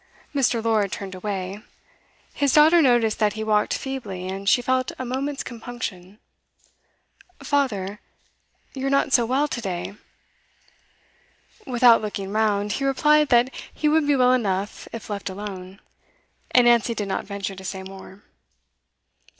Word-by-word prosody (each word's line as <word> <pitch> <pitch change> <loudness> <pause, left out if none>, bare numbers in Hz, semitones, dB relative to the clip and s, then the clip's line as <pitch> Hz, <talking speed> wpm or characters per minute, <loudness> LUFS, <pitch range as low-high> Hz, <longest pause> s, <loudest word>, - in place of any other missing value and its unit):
Mr. 250 -5 +1
Lord 215 -4 +1
turned 195 -1 -6
away. 190 +1 -5 0.7
His 285 -2 +1
daughter 315 +3 +7
noticed 240 -6 +3
that 210 -2 +2
he 220 - -4
walked 210 -1 +1
feebly, 210 -9 -5
and 195 +1 -2
she - - +5
felt 255 0 0
a 255 - -5
moment's 270 +3 -3
compunction. 220 -6 -7 1.3
'Father 215 -9 -1 0.7
you 270 0 -3
are - - +1
not 275 -1 +1
so 235 -2 +4
well 270 +4 +1
to 240 - -4
day.' 190 -2 -4 1.7
Without 240 -2 +5
looking 200 -2 -5
round, 210 -1 +1
he 275 - -2
replied 300 +2 +3
that 245 +2 +3 0.2
he 305 - -1
would 305 0 +3
be 290 - +4
well 250 -1 +4
enough 200 -5 -2
if 230 - -8
left 205 -2 -4
alone; 190 -1 -8 0.7
and 250 -1 +5
Nancy 235 -1 +3
did 210 -2 -3
not 190 - -3
venture 200 -1 -5
to 190 - -11
say 190 +1 -5
more. 190 +1 -12
220 Hz, 145 wpm, -23 LUFS, 195-260 Hz, 1.7 s, daughter